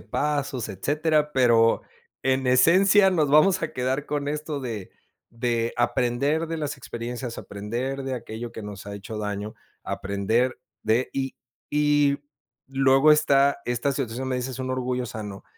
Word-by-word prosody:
pasos, 140 -6 -2
etcétera, 150 - 0
pero 115 -3 +4 0.4
en 130 0 +1
esencia 185 +10 +5
nos 155 -5 +2
vamos 180 +6 +5
a 165 - -2
quedar 130 +3 -1
con 145 -1 -2
esto 150 0 -3
de, 115 -7 -5 0.4
de 115 0 -1
aprender 125 +6 +1
de 165 - -3
las 145 -2 -3
experiencias, 120 -1 -6
aprender 120 +7 -4
de 135 -1 -2
aquello 115 -1 -6
que 110 - -7
nos 105 -1 -8
ha 100 - -6
hecho 100 +2 -7
daño, 105 0 -4 0.3
aprender 110 +6 -1 0.2
de 115 +4 +1
y 135 -1 -2 0.3
y 145 -1 +3 0.5
luego 135 +2 +4
está, 140 -2 +4
esta 120 +3 0
situación, 130 -1 -3
donde 130 - 0
dices: 125 0 -4
"Un 130 0 -3
orgullo 125 -1 -1
sano". 105 -3 -7
130 Hz, 145 wpm, -25 LUFS, 115-145 Hz, 0.5 s, esencia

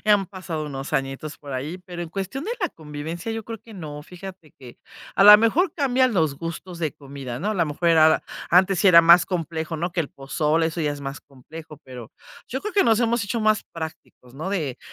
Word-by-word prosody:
han 205 -2 +4
pasado 180 -5 -5
unos 135 -2 -5
añitos 135 +3 -3
por 140 -2 -10
ahí, 145 +7 -4
pero 175 -1 -8
en 170 - -5
cuestión 195 - -5
de 465 - -2
la 360 -5 -1
convivencia 160 +6 -7
yo 225 -1 -5
creo 225 -1 -7
que 225 -2 -14
no, 150 -5 -7
fíjate 180 -2 -11
que 125 -3 -13 0.4
a 195 - +4
la 210 0 +12
mejor 300 - +2
cambian 260 -5 +2
los 155 -6 +1
gustos 170 +1 -6
de 160 -2 -2
comida, 135 -4 -8
¿no? 205 +9 -2
A 215 - -1
la 165 -4 +1
mejor 165 +3 0
era 160 -1 +5 0.3
antes 185 +1 +4
sí 195 - +5
era 170 -2 +8
más 170 +1 +7
complejo, 165 -2 -3
¿no?, 170 +2 -3
que 175 - 0
el 150 - -3
pozole, 150 +4 0
eso 165 +1 -5
ya 150 -2 0
es 145 -1 -8
más 135 +1 -6
complejo, 150 +4 -12
pero 125 -3 -10 0.4
yo 265 +2 -4
creo 425 - -4
que 400 - +4
nos 225 -1 +3
hemos 235 -1 +1
hecho 215 +4 -2
más 215 -1 +2
prácticos, 160 -6 -9
¿no?, 155 +7 -5
de: 155 -10 -2
165 Hz, 225 wpm, -23 LUFS, 150-200 Hz, 0.4 s, la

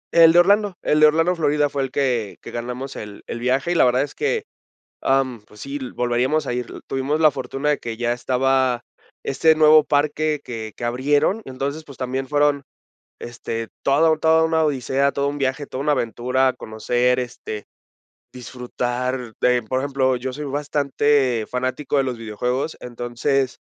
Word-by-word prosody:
El 165 -1 +8
de 170 - +3
Orlando, 200 +2 +4
el 150 - +2
de 155 - +8
Orlando, 165 +4 +2
Florida, 150 -2 +1
fue 140 0 -2
el 135 - -2
que 125 -6 -1
que - - -8
ganamos 125 +3 -5
el 105 -1 -9
el 120 - -5
viaje, 130 +7 0
y - - 0
la - - +5
verdad 125 +1 +3
es 145 - -7
que, - - -1 0.6
am, 135 -4 +1
pues, 105 - -15
sí 140 +1 -5
l 130 -3 -7
volveríamos 125 +5 0
a - - -2
ir 125 -1 -3
l - - -9
Tuvimos 135 +3 -1
la 155 -2 +6
fortuna 135 +2 -3
de 150 - +1
que 115 -1 -6
ya 120 0 0
estaba 130 0 +1 0.4
este 160 +4 +3
nuevo 155 0 +6
parque 150 +1 0
que 110 -3 -6
que - - -8
abrieron, 145 - +1
entonces, 140 +4 -4
pues, 140 -3 -13
también 130 +1 -3
fueron, 145 0 +2 0.6
este, 115 -1 -5
toda 145 +4 +4
la 160 - +3
toda 160 +1 +4
una 160 0 +2
odisea, 140 -1 0
todo 140 0 0
un 145 - -5
viaje, 135 +1 -1
toda 130 - -6
una 150 0 +2
aventura, 125 +1 +1
conocer, 125 +3 0
este, 115 -3 -6 0.7
disfrutar, 125 0 -4
eh, 125 -1 +3
por 130 0 0
ejemplo, 135 -1 +1
yo 130 +1 -4
soy 150 +3 -6
bastante 140 -4 +1
fanático 130 +3 -2
de 135 - +3
los 130 -2 -3
videojuegos, 125 +6 -3
entonces, 125 +2 -2
135 Hz, 180 wpm, -22 LUFS, 125-145 Hz, 0.7 s, El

